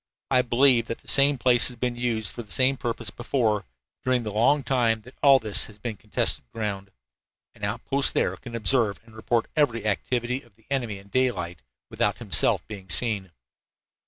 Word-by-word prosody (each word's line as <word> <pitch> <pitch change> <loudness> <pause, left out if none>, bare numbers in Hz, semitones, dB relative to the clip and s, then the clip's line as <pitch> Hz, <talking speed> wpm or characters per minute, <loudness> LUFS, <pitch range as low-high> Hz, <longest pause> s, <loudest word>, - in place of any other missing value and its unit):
I 130 -1 +5
believe 125 -1 +3
that 115 - -4
the - - -24
same 140 0 +4
place 125 -1 +4
has 125 - -5
been 125 0 -2
used 115 -4 -2
for - - -7
the 110 - -15
same 130 +4 +2
purpose 120 -3 -4
before, 115 -4 -1 0.4
during 130 -2 +1
the 105 - -4
long 130 +7 +2
time 115 -5 +1
that 125 +3 -14
all 140 -1 +7
this 105 -5 +1
has 105 - -14
been 110 +1 -5
contested 105 0 0
ground. 100 -3 -4 0.6
An - - -18
outpost 120 +7 +1
there - - +1
can 120 -2 -9
observe 115 -2 +3
and 115 -1 -18
report 115 +1 0
every 120 -8 +1
activity 120 +4 -1
of 120 -4 -24
the 115 0 -29
enemy 120 -7 -2
in 100 +1 -16
daylight, 100 - -1 0.3
without - - -1
himself - - +2
being 100 -3 -10
seen." 100 -2 0
115 Hz, 185 wpm, -25 LUFS, 105-130 Hz, 0.6 s, all